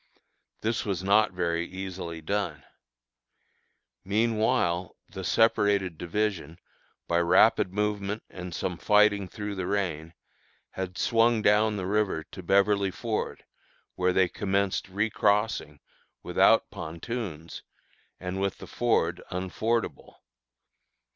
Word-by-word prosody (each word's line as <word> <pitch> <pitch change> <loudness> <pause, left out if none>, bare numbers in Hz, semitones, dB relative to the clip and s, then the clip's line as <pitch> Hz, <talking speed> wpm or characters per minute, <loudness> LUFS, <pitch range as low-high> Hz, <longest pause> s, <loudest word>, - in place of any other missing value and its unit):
This 115 +2 -1
was 95 -3 -2
not 105 +3 +4
very 85 -2 -1
easily 90 -3 -6
done. 90 -3 -2 1.4
Meanwhile 105 -4 +1
the 95 - -8
separated 100 -4 +2
division, 90 -2 -2 0.5
by 85 - +2
rapid 85 +1 +4
movement 105 +1 -2
and 90 -1 -8
some 90 -3 -3
fighting 105 -2 +4
through 105 +2 -5
the 95 -2 -4
rain, 85 -5 -2 0.6
had 95 -1 -5
swung 115 -1 +3
down 105 +1 +3
the 95 - -3
river 100 -5 0
to - - -8
Beverly 100 +2 +3
Ford, 110 +3 -4 0.5
where 90 0 +1
they 95 0 +3
commenced 100 0 -1
recrossing, 105 -5 0 0.4
without - - +3
pontoons, 85 -1 -6 0.6
and 90 +1 -4
with 100 -1 -1
the - - -10
ford 90 -8 0
unfordable. 100 +6 -2
95 Hz, 110 wpm, -27 LUFS, 90-105 Hz, 1.4 s, not